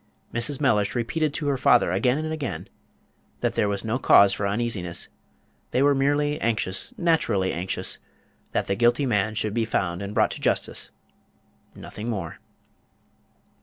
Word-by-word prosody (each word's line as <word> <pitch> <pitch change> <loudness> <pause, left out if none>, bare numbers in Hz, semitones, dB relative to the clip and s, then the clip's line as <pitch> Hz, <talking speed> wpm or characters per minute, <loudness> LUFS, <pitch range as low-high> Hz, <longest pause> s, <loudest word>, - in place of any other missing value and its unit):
Mrs. 120 +4 +1
Mellish 105 -8 +1
repeated 150 +6 0
to 150 - -3
her 140 -2 0
father 120 -8 +4
again 125 +8 +2
and 155 +1 -3
again 150 -5 -5 0.7
that - - 0
there 105 - +1
was 100 +1 -2
no 115 +4 -1
cause 100 -6 +6
for 100 - -1
uneasiness; 100 -5 -2 0.6
they 130 - +1
were 145 0 +5
merely 145 +2 +1
anxious 100 -5 0
naturally 115 - +1
anxious 90 +3 -2 0.5
that - - 0
the - - -1
guilty 120 +5 +2
man 110 -3 0
should 105 -1 0
be 115 0 +1
found 95 -5 -1
and 100 +1 -6
brought - - +3
to - - -7
justice - - -1 0.9
nothing 110 +3 -7
more. 95 -8 -4
115 Hz, 155 wpm, -25 LUFS, 100-140 Hz, 0.9 s, cause